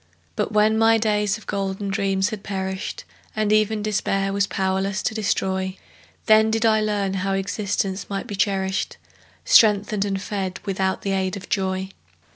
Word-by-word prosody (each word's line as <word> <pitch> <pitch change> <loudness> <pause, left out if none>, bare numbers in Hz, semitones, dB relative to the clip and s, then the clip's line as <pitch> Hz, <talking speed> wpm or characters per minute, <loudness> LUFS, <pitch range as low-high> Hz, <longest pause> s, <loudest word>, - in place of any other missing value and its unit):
But - - -1
when 215 +1 +3
my 225 0 +5
days 210 -2 +1
of 220 - -15
golden 195 0 -3
dreams 195 +1 0
had 215 -2 -5
perished, 190 -1 -4 0.3
And 215 -1 +1
even 215 0 +2
Despair 195 -2 0
was 200 0 +1
powerless 190 +1 -1
to - - 0
destroy, 190 -3 -1 0.5
Then 220 0 +5
did 225 +1 +1
I 220 -1 +4
learn 205 -2 0
how 195 0 -1
existence 195 0 -2
might 195 -1 -3
be 205 - -5
cherished, 190 0 -1 0.5
Strengthened 210 -1 +4
and 195 -1 -2
fed 195 -1 -4
without 190 -1 -1
the 195 - -1
aid 190 0 -1
of 195 - -11
joy. 190 -1 -1
195 Hz, 160 wpm, -23 LUFS, 190-210 Hz, 0.5 s, my